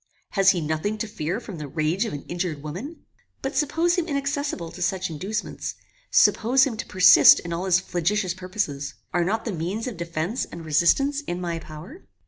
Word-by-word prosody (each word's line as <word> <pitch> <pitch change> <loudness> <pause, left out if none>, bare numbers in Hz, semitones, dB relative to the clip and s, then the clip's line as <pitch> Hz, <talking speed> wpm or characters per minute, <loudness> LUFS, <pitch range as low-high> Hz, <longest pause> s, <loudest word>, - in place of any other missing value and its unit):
Has 195 -2 +4
he 180 -3 +2
nothing 155 +8 -2
to 220 - -3
fear 185 0 -3
from 200 -9 -9
the 150 - -5
rage 160 - 0
of 220 - -4
an 145 - -6
injured 175 -4 -4
woman? 205 - -7 0.4
But 270 - -3
suppose 325 +4 +1
him 340 - -2
inaccessible 280 - -2
to 180 - -10
such 185 0 -1
inducements; 200 +8 -4 0.3
suppose 255 +4 +4
him 265 -5 0
to - - -5
persist 185 -2 +8
in 170 -1 -5
all 175 +3 -3
his 185 -1 +4
flagitious 185 +1 -1
purposes; 180 -7 -4 0.2
are 175 0 +2
not 220 +5 -1
the 225 - -2
means 185 +6 -3
of 245 -7 -5
defence 170 +7 -2
and 170 -1 -10
resistance 275 - +2
in 175 - -3
my 170 -2 -3
power? 165 - -11
185 Hz, 190 wpm, -24 LUFS, 165-225 Hz, 0.4 s, persist